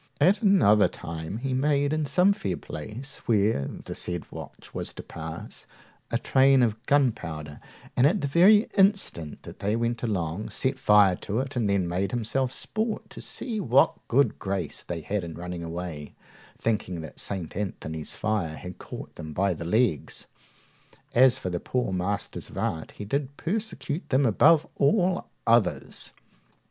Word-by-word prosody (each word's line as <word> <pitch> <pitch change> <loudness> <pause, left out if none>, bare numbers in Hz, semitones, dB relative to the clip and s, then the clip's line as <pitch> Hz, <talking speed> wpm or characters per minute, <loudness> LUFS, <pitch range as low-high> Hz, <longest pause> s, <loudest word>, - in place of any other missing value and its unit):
At 195 +6 +4
another 175 - +5
time 80 +4 -6
he 130 +2 -2
made 145 +2 +2
in 155 -1 0
some 180 +8 +4
fair 95 - -3
place, 110 - -6
where 105 - +2 0.2
the - - -5
said 85 -2 -3
watch - - -10
was - - -5
to - - -7
pass, - - -8 0.4
a - - +1
train 135 -1 +4
of 110 0 0
gunpowder, 80 - 0 0.4
and, 125 - +5
at 190 +7 +1
the - - -1
very 195 +9 +6
instant 190 - +2
that - - -11
they 105 +2 0
went 115 0 -1
along, 95 -4 -2
set 130 0 -1
fire 105 -6 +6
to 105 - -3
it, 135 +2 -2
and 115 -4 +1
then 100 -3 +2
made 90 +3 -1
himself 120 +3 -1
sport 220 - -3
to - - -9
see 230 -4 -4
what 135 - +4
good 140 +4 +2
grace 95 -5 -3
they 85 -2 -5
had 100 +3 -2
in 85 -2 -6
running 90 0 -5
away, 85 -3 -6 0.4
thinking 105 -6 -1
that 80 - -9
St. 95 -5 -4
Anthony's 80 -6 -4
fire 105 -8 -1
had 90 +2 -9
caught - - -8
them 80 -1 -8
by 95 +3 +1
the 85 0 -7
legs. 105 - +1 0.9
As 130 +1 +6
for 90 - -4
the 85 - -2
poor 125 -3 -1
masters 95 +3 -2
of - - -11
arts, 80 -1 -3
he 105 - -5
did 140 +5 -2
persecute 170 - -3
them 135 +1 +3
above 155 +8 +5
all 180 +5 +2 0.2
others. 115 -1 +1
110 Hz, 165 wpm, -27 LUFS, 90-140 Hz, 0.9 s, very